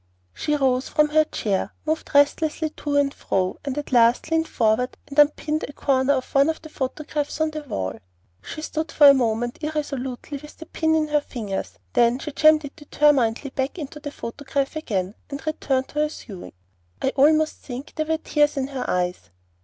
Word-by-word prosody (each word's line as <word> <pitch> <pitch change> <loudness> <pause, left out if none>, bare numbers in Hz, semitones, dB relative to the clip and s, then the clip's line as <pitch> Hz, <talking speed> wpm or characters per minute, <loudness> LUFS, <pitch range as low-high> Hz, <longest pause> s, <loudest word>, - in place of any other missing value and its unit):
She 300 -1 -1
rose 265 -2 +1
from 300 0 +3
her 310 +1 +4
chair, 200 -7 -2
moved 315 +1 -2
restlessly 300 +2 +3
to 290 -2 -2
and 280 -1 +2
fro, 185 -1 -1
and 280 -1 -4
at 295 - -4
last 240 +5 +4
leaned 325 0 +2
forward 230 +2 +1
and 280 +1 -2
unpinned 300 +1 +3
a 290 - -10
corner 270 -1 +2
of 260 -2 -3
one 275 +2 +5
of 320 - -2
the 315 - -9
photographs 295 +2 -3
on 315 0 +1
the 305 0 -5
wall. 95 - -4 0.4
She 310 - -7
stood 315 -1 -3
for 290 - +7
a - - +9
moment 240 -2 0
irresolutely 285 -3 -4
with 300 +2 -13
the 325 - -9
pin 320 0 0
in 310 -1 +1
her 295 0 +2
fingers, 210 -9 -5 0.2
then 240 +1 +4
she 300 +3 -6
jammed 310 +1 +5
it 285 - -9
determinedly 280 -4 +2
back 265 +5 -2
into 300 -2 -7
the 290 -1 -6
photograph 275 +2 -4
again, 200 - -2 0.2
and 280 +1 -7
returned 270 -4 -1
to 300 - -4
her 300 0 +2
sewing. 200 - -10 0.5
I - - +1
almost 310 +3 +3
think 260 +2 -8
there 310 0 -2
were 320 0 +1
tears 295 -2 +1
in 270 0 -1
her 270 -2 -4
eyes. 180 0 -1
285 Hz, 190 wpm, -23 LUFS, 255-305 Hz, 0.5 s, a